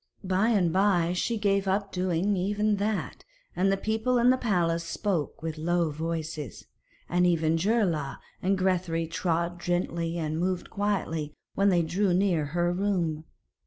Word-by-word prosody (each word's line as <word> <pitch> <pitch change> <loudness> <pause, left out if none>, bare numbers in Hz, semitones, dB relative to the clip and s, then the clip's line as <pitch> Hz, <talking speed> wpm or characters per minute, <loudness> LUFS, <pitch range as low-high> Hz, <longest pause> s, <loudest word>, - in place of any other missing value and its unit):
By 190 +3 +2
and 185 -8 +2
by 185 -3 +3
she 230 +6 -1
gave 200 -2 +1
up 195 +1 0
doing 185 +2 0
even 205 +3 +1
that, 210 +1 -2 0.3
and 195 +1 +2
people 220 +3 +1
in 240 +1 +5
the - - +4
palace 170 -8 +1
spoke 170 -3 -2
with 160 -1 -4
low 170 0 +1
voices, 160 -3 -4 0.4
and 180 +1 +2
even 165 -2 +2
Geirlaug 170 -6 0 0.2
and 195 +1 +1
Grethari 180 -3 0
trod 170 +1 -1
gently 170 -1 -1
and 155 -1 -2
moved 180 0 -2
quietly 190 -7 -2 0.2
when 200 +1 +3
they 175 -3 +3
drew 180 +3 +1
near 180 -5 +2
her 175 +4 0
room. 175 -5 -1
180 Hz, 150 wpm, -27 LUFS, 165-200 Hz, 0.4 s, in